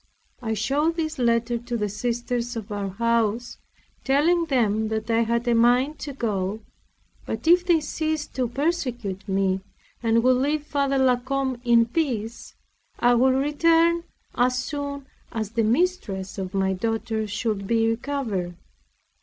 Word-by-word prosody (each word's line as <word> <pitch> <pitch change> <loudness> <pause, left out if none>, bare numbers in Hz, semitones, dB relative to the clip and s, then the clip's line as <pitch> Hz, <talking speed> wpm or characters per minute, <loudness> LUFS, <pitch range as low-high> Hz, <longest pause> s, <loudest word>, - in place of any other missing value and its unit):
I 220 -2 -2
showed 295 +9 +1
this 315 -3 -3
letter 235 0 +1
to 240 0 -4
the 210 -2 -1
sisters 240 +3 -2
of 220 -2 -6
our 200 -1 -2
house, 230 +2 0 0.4
telling 325 +6 +3
them 220 -7 +1
that 220 +1 -2
I 225 0 +3
had 235 +1 0
a 240 - +4
mind 245 +6 +3
to 290 - -5
go; 210 -4 -2 0.7
but - - -4
if 350 +1 +6
they 335 -3 +4
ceased 315 0 -3
to 255 -2 0
persecute 245 - -2
me, 190 0 +1 0.4
and 230 0 +2
would 255 0 +4
leave 290 +3 0
Father 280 -2 0
La 260 -2 +4
Combe 260 0 -2
in 235 -1 +5
peace, 235 -5 -3 0.4
I 245 0 +4
would 260 +2 +4
return 330 +4 +3 0.3
as 250 +1 +2
soon 280 +1 -4 0.3
as 220 -2 -3
the 230 0 0
mistress 220 - 0
of 190 0 -5
my 190 0 +1
daughter 220 +2 -2
should 210 -1 -2
be 225 0 +2
recovered. 225 -7 -2
240 Hz, 150 wpm, -24 LUFS, 220-280 Hz, 0.7 s, if